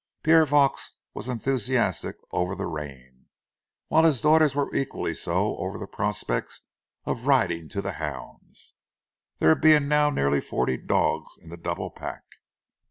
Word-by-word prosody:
Pierre 160 0 +5
Vaux 145 -2 +2 0.2
was - - -6
enthusiastic 125 -4 0 0.2
over 90 +2 -1
the 100 - -4
rain, 65 -4 -8 0.6
while 160 - +4
his 155 -6 +4
daughters 155 -1 +4
were 145 -1 -1
equally 135 - -2
so - - -1
over - - -4
the - - -6
prospects - - -3 0.4
of 120 +3 -4
riding 85 - +2
to 100 - -4
the 100 - -2
hounds, 75 -2 -7 0.6
there 80 - +5
being 150 - +4
now 150 0 +3
nearly 70 - +1
forty 65 - -1
dogs - - -1
in 80 - -16
the 85 - -8
double 85 - -4
pack. - - -8
120 Hz, 145 wpm, -25 LUFS, -, 0.6 s, Pierre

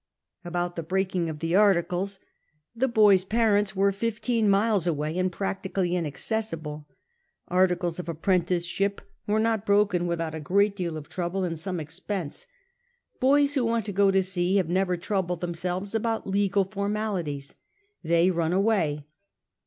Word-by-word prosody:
About 175 0 -3
the 165 - -3
breaking 185 0 -1
of 155 - -5
the 165 +3 -1
articles, 195 -1 +2 0.6
the 260 +3 +1
bov's 210 -5 +5
jxirtfuts 205 -1 +2
were 200 +1 +3
fifteen 230 +1 0
miles 200 -2 +2
away, 155 -1 -1
and 185 0 +1
luactically 190 -1 -2
iiiaccessiblq; 165 -2 -3 0.6
articles 180 -1 +1
of 175 - -5
apprenticeship 180 +3 0 0.3
were 210 +1 +2
not 220 -2 +1
bi 205 - +2
oken 195 -4 +2
withojit 165 -2 -2
a 160 - -4
great 200 +6 +2
deal 170 -5 -3
of 150 - -9
trouble 185 +1 -3
an<l 170 -2 -2
some 180 +1 -4
expense; 165 +1 -5 0.7
boys 285 +2 +4
who 270 -4 +1
want 230 -2 0
to 210 - -3
go 200 0 +3
to 195 0 +3
sea 185 0 0
have 185 -5 +2
never 185 0 +1
troubled 180 -2 -2
themselves 180 +3 -3
about 225 0 -1
legal 200 0 +1
formalities; 200 -8 -3 0.5
they 170 +2 +3
run 170 -1 0
away. 185 -8 +1
185 Hz, 150 wpm, -26 LUFS, 170-205 Hz, 0.7 s, bov's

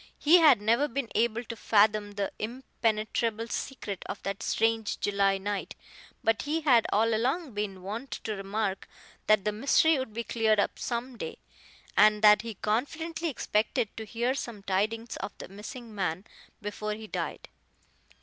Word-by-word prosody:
He 335 +4 +6
had 295 -10 +6
never 235 +7 +3
been 270 -2 -3
able 235 +1 +1
to 230 - -7
fathom 210 -1 +3
the 200 -1 -2
impenetrable 225 -1 -1
secret 210 -9 -4
of - - -5
that 195 +1 -3
strange 225 -1 0
July 200 -1 +2
night, 200 +1 -4 0.5
but 225 -2 +2
he 310 +3 -1
had 250 -7 +4
all 225 +2 +3
along 260 +6 0
been 200 -3 -4
wont 225 +8 -5
to 215 - -2
remark 195 0 -2 0.4
that 215 -2 +4
the 210 - +2
mystery 280 +7 +3
would 260 -3 -4
be 235 +2 -4
cleared 220 -2 +2
up - - 0
some 240 0 -4
day, - - -5 0.6
and 210 0 +5
that 210 0 +8
he 230 -2 -6
confidently 320 - -2
expected 220 -4 -1
to 220 - -5
hear 235 +4 -1
some 235 -7 -6
tidings 215 +5 -1
of - - -6
the - - -8
missing 220 +4 -9
man 185 -1 -2 0.4
before 210 +1 -3
he 220 +1 -9
died. - - -4
220 Hz, 160 wpm, -29 LUFS, 205-240 Hz, 0.6 s, that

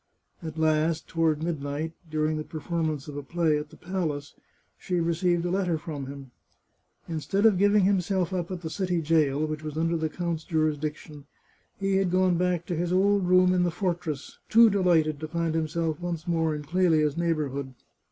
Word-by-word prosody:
At 160 -2 -7
last, 155 0 +1
toward 160 -2 +1
midnight, 155 -1 -3 0.2
during 155 0 0
the 155 - -3
performance 155 -2 -3
of 145 - -7
a 145 - -4
play 160 +1 +1
at 150 0 -7
the - - -15
palace, 160 -6 -3 0.4
she 180 -2 -2
received 170 +1 +1
a 175 - -1
letter 180 -3 +1
from 150 -4 -6
him. 135 -2 -9 0.8
Instead 170 +6 -1
of 205 -5 +5
giv 205 +1 +4
ing 205 - +5
himself 190 -1 +1
up 175 -2 -2
at 185 -2 -5
the 160 - -5
city 180 -2 -1
jail, 155 -2 +2
which 155 -1 -4
was 155 -1 -6
under 165 +1 +1
the 160 -1 -1
count's 170 -1 -3
jurisdiction, 155 -2 -2 0.5
he 195 -1 +1
had 195 -2 +2
gone 185 0 +3
back 180 -1 0
to 175 - -3
his 175 +2 -1
old 195 0 +3
room 185 0 +5
in 180 - +2
the 175 - +2
fortress, 175 -5 -3
too 230 0 +7
delighted 165 -6 +2
to 155 - -5
find 165 0 -1
himself 160 0 -1
once 175 -1 -4
more 160 -2 +1
in 150 - -6
Clelia's 155 -2 +2
neigh 170 0 +1
bourhood. 140 -3 -4
165 Hz, 190 wpm, -27 LUFS, 155-180 Hz, 0.8 s, too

